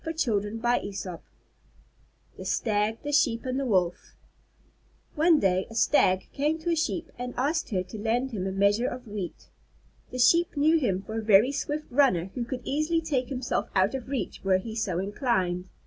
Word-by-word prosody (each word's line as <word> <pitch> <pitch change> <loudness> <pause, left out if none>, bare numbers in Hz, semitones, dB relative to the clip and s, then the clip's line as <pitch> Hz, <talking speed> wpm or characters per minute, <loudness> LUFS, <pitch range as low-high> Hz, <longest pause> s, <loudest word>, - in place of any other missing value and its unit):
_ 225 - -1 1.1
THE - - -9
STAG, 215 0 0
THE 290 - -3
SHEEP, 230 -5 +2
AND 255 +1 -1
THE 275 - -2
WOLF 180 -5 0 1.0
One 315 0 +4
day 190 -1 +1
a 225 - -10
Stag 190 -6 +3
came 295 +3 0
to 345 +1 -1
a - - +2
Sheep 325 +1 -2
and 245 0 -5
asked 300 +6 0
her 185 -5 0
to 185 +4 -9
lend 240 +5 0
him 190 -4 -3
a - - -2
measure 200 +5 +2
of 250 +1 -6
wheat. 205 -4 -7 0.6
The 255 - -6
Sheep 335 +6 +4
knew 315 +3 +4
him 195 -9 0
for 220 +2 -4
a - - -5
very 215 +4 +5
swift 295 +2 -3
runner, 215 -10 +3
who 245 - -2
could 250 +1 -5
easily 310 +4 0
take 265 -6 -1
himself 255 -2 -2
out 190 +4 +3
of 265 -3 -5
reach, 270 -3 -4
were 190 -1 +3
he 220 +4 -6
so 205 -6 -1
inclined. 190 -3 -1
235 Hz, 180 wpm, -27 LUFS, 195-280 Hz, 1.1 s, very